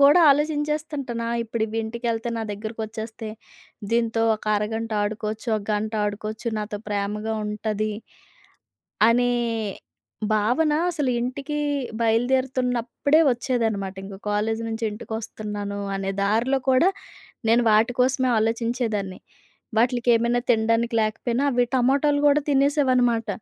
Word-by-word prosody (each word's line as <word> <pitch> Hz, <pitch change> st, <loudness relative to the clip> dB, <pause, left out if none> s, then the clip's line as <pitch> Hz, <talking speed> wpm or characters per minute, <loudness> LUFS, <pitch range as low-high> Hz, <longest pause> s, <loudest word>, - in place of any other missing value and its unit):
కూడా 285 Hz, +5 st, +7 dB
ఆలోచించేస్తుంటాను 295 Hz, -4 st, -1 dB
ఆ -, -, -2 dB
ఇప్పుడు 230 Hz, 0 st, -3 dB
ఇవింటికెళ్తే 225 Hz, +1 st, -3 dB
నా 225 Hz, -, -2 dB
దెగ్గరకొచ్చేస్తే, 220 Hz, +1 st, -6 dB, 0.6 s
దీంతో 230 Hz, -1 st, +1 dB
ఒక 215 Hz, -, -10 dB
అరగంట 220 Hz, +2 st, -2 dB
ఆడుకోవచ్చు, 215 Hz, +2 st, -3 dB
ఒక 210 Hz, -, -4 dB
గంట 215 Hz, +1 st, -1 dB
ఆడుకోవచ్చు. 215 Hz, +3 st, -4 dB
నాతో 210 Hz, 0 st, -4 dB
ప్రేమగా 210 Hz, +2 st, -2 dB
ఉంటది. 215 Hz, 0 st, -2 dB, 1.2 s
అనే 245 Hz, +1 st, +3 dB, 1.0 s
భావన 245 Hz, +9 st, +2 dB, 0.2 s
అసలింటికీ 275 Hz, 0 st, -2 dB, 0.4 s
బయలుదేరుతున్నప్పుడే 250 Hz, +4 st, +1 dB
వచ్చేదన్నమాట. 225 Hz, -6 st, -1 dB
ఇంగ 195 Hz, 0 st, -8 dB
కాలేజి 220 Hz, +2 st, 0 dB
నించి 225 Hz, +1 st, -3 dB
ఇంటికొస్తున్నాను 210 Hz, -2 st, -5 dB, 0.2 s
అనే 195 Hz, 0 st, -2 dB
దారిలో 230 Hz, +7 st, +2 dB
కూడా 260 Hz, +8 st, +5 dB, 0.6 s
నేను 235 Hz, +2 st, +5 dB
వాటి 220 Hz, +3 st, +4 dB
కోసమే 255 Hz, 0 st, +2 dB
ఆలోచించేదాన్ని. 225 Hz, -3 st, -1 dB, 0.6 s
వాటిల్‌కేమైనా 240 Hz, 0 st, +3 dB
తిండానికి 230 Hz, +1 st, +1 dB
లేకపోయినా 235 Hz, +4 st, -1 dB
అవి 245 Hz, -1 st, +3 dB
టమొటాలు 280 Hz, +3 st, +3 dB
గూడా 290 Hz, +1 st, +4 dB
తినేసేవనమాట. 260 Hz, -5 st, +2 dB
230 Hz, 105 wpm, -24 LUFS, 215-255 Hz, 1.2 s, కూడా